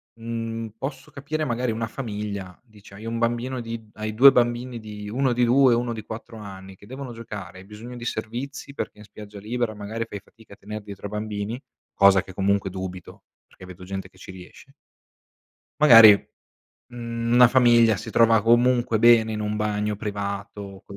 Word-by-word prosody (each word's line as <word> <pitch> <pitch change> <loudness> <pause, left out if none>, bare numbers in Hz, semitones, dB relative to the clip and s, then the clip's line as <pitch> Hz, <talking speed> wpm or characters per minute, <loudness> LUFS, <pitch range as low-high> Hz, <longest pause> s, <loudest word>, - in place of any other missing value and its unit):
mhmm, 115 0 -5
posso 135 +1 -6
capire 155 +3 -4
magari 125 -2 -1
una 115 +1 -3
famiglia, 105 -6 -6
dici 105 -5 -18
hai 105 +3 -11
1 115 0 -3
bambino 120 +2 -1
di 115 -1 -7
hai 110 0 -5
2 135 +5 +8
bambini 120 0 0
di 105 -1 -9
1 130 +3 0
di 120 0 +2
2 130 +2 +5
e - - +3
1 120 0 -2
di 110 -1 -7
4 115 +1 -9
anni, 95 -2 -10
che 100 - -18
devono 130 +1 -8
giocare, 105 -5 -9
hai 95 - -13
bisogno 110 +4 -10
di 120 -1 -8
servizi 125 +5 -5
perché 125 - -6
in - - -12
spiaggia 105 0 -12
libera 115 +2 -3
magari 110 +2 -5
fai 105 - -7
fatica 110 +1 -19
a - - -15
tener 105 +1 -7
dietro 100 0 -8
a - - -10
bambini, 105 +3 -4 0.3
cosa 100 -1 +5
che 95 - -12
comunque 100 +1 0
dubito, 95 -1 -8 0.2
perché 95 - -15
vedo 90 0 -12
gente 95 0 -6
che 95 - -25
ci 95 - -11
riesce. 90 -1 -14 1.1
Magari, 115 -7 +10 0.8
mhmm, 115 -1 -3
una 125 0 +8
famiglia 120 -3 +4
si - - -8
trova 115 -2 +4
comunque 120 -1 +3
bene 115 -1 +5
in 105 - -4
un 105 0 -2
bagno 105 0 -1
privato. 100 -1 -6
110 Hz, 185 wpm, -24 LUFS, 100-120 Hz, 1.1 s, Magari